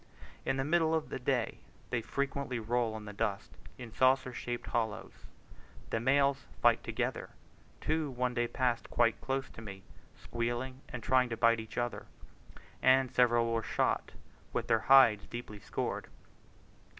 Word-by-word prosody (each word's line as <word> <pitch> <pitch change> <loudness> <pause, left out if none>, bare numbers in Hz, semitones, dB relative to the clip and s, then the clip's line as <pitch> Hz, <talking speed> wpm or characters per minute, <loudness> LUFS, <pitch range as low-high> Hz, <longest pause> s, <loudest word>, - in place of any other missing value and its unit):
In 135 - +1
the 135 - 0
middle 160 +2 +2
of 160 - -2
the - - -4
day 125 -2 -1 0.3
they 120 - 0
frequently 140 +1 -2
roll 115 0 -1
in 105 - -9
the 105 - -7
dust, 100 -1 -2 0.3
in 120 -3 -9
saucer 130 +1 +3
shaped 120 0 -4
hollows. 110 -1 -2 0.8
The 115 - +1
males 140 +3 +2
fight - - +4
together; - - -2 0.5
two 155 -1 0
one 125 -1 -1
day 120 -1 0
passed 125 -1 -1
quite 115 -2 +2
close 135 0 -2
to - - -11
me, 95 -3 -9 0.3
squealing 120 +3 -3
and 120 - -6
trying 130 -1 +3
to 115 - -3
bite 115 0 +4
each 110 0 -9
other; 120 0 -2 0.7
and 130 0 +4
several 120 -2 +3
were 115 - +1
shot - - -1 0.4
with - - -1
their 115 - +3
hides 125 -7 +7
deeply 120 -3 -7
scored. 100 - -3
120 Hz, 155 wpm, -32 LUFS, 115-130 Hz, 0.8 s, hides